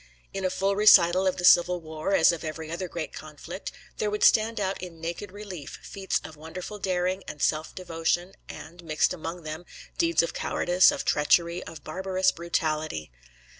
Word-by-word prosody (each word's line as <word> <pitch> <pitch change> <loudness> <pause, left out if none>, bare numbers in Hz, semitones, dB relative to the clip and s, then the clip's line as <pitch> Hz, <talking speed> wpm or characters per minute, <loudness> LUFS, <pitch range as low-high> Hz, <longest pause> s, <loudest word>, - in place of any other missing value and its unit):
In 195 - -4
a 185 - +2
full 195 +2 0
recital 190 -3 +6
of 185 - 0
the 180 - -1
civil 180 0 +6
war, 160 +3 -2
as 160 - +6
of 170 -1 -5
every 160 0 -6
other 180 +2 -3
great 170 -2 -5
conflict, 155 +5 -8 0.3
there 210 - 0
would 210 0 -2
stand 225 0 +4
out 195 -2 -2
in 175 -3 -8
naked 170 +4 -5
relief 190 -7 -8
feats 195 -1 -2
of 155 - -10
wonderful 175 +7 -8
daring 185 0 -1
and 150 - -7
self 155 +2 0
devotion, 175 +1 -2 0.2
and, 175 +2 -10
mixed 155 -2 +1
among 165 +1 -6
them, 155 +2 -6 0.4
deeds 165 -1 +3
of 170 - -3
cowardice, 180 +1 +3
of - - -4
treachery, 170 +4 +2
of 160 -3 -10
barbarous 185 +2 0
brutality. 155 - -2
175 Hz, 175 wpm, -27 LUFS, 160-190 Hz, 0.4 s, recital